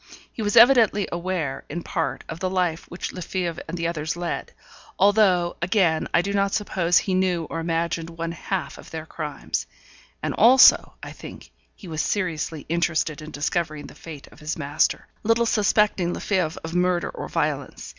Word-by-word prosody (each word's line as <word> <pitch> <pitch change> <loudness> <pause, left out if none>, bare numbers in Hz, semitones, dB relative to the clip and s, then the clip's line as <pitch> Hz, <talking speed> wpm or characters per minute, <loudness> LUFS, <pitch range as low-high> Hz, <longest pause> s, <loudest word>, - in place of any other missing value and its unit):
He - - -6
was 205 -1 0
evidently 230 -6 +6
aware, 170 -5 -3
in 170 +3 -5
part, 165 - -2
of 160 - -7
the 185 - -1
life 180 -3 -1
which 175 - -5
Lefebvre 180 -2 -3
and 165 +2 -5
the 165 0 -1
others 160 0 -3
led; 175 -1 -4 0.5
although, 190 -3 +3
again, 180 -4 +2
I 170 - +3
do 200 +1 -2
not 200 0 +1
suppose 180 -4 +1
he 195 -4 +1
knew 185 -2 +1
or 165 - -3
imagined 165 0 -1
one 165 0 -4
half 180 +3 -4
of - - -12
their 160 -1 -6
crimes; 150 - -4 0.6
and - - -1
also, 250 - +6
I - - -7
think, - - -11 0.2
he - - -12
was 155 -2 -2
seriously 165 -6 -2
interested 165 -2 0
in 155 - -8
discovering 155 0 -2
the - - -11
fate 155 -4 -10
of - - -17
his 150 0 -4
master, 145 -2 0 0.2
little 230 +2 +2
suspecting 210 -5 +2
Lefebvre 180 -6 -1
of 160 +1 -6
murder 180 0 +1
or - - -7
violence. - - -2
170 Hz, 175 wpm, -24 LUFS, 160-190 Hz, 0.6 s, evidently